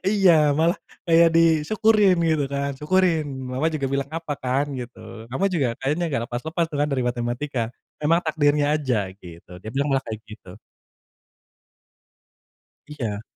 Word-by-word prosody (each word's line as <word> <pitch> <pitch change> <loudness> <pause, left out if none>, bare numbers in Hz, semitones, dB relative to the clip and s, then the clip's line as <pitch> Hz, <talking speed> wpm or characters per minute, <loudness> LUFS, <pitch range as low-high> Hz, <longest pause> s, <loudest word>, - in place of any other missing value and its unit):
Iya, 175 -7 +4
malah 170 +4 +2 0.3
kayak 165 0 +6
disyukurin 185 +5 +4
gitu 155 -3 +2
kan. 140 0 -2
"Syukurin, 165 +1 +2 0.3
mama 135 +5 +1
juga 155 -4 -3
bilang 140 0 -1
apa 165 -2 -4
kan", 130 +3 -1
gitu. 115 -2 -9
Kamu 160 +10 -1
juga 145 -7 +1
kayaknya 150 +6 0
enggak 135 -6 -1
lepas-lepas 160 +7 -2
tuh 145 - -3
kan 150 - +2
dari 135 -3 -1
matematika. 120 +1 -2 0.3
Memang 165 +3 +3
takdirnya 145 -1 +2
aja, 120 -10 -1
gitu. 90 +1 -12
Dia 110 - -9
bilang 140 +2 0
malah 135 - +2
kayak 110 -1 -5
gitu. 105 -3 -12 2.3
Iya. 115 -9 -4
145 Hz, 145 wpm, -23 LUFS, 125-165 Hz, 2.3 s, kayak